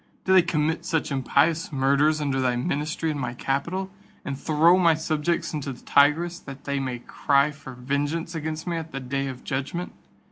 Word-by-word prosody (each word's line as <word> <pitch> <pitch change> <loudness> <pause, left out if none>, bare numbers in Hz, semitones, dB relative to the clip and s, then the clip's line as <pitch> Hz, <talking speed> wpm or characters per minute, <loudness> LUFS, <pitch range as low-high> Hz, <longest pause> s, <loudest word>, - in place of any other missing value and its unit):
Do 190 - +3
they 190 - +8
commit 160 -1 0
such 160 -2 -1
impious 145 +5 +1
murders 140 +3 +2
under 140 -3 0
thy 125 -1 +1
ministry 150 +5 -1
in 145 - -4
my 125 -2 -3
capital, 170 +10 -2 0.3
and 140 - -3
throw 160 +5 +4
my 170 -3 +5
subjects 160 +2 -1
into 145 -2 -3
the 125 - -15
Tigris, 165 +5 +3
that 135 -4 -10
they 140 0 -1
may 130 -2 -3
cry 140 +4 +1
for 140 -3 -11
vengeance 145 +6 -2
against 155 0 -4
me 170 -2 -2
at 160 -1 -6
the 135 - -3
day 135 +1 -2
of 130 -2 -7
judgment? 140 +7 -3
150 Hz, 185 wpm, -25 LUFS, 135-165 Hz, 0.3 s, they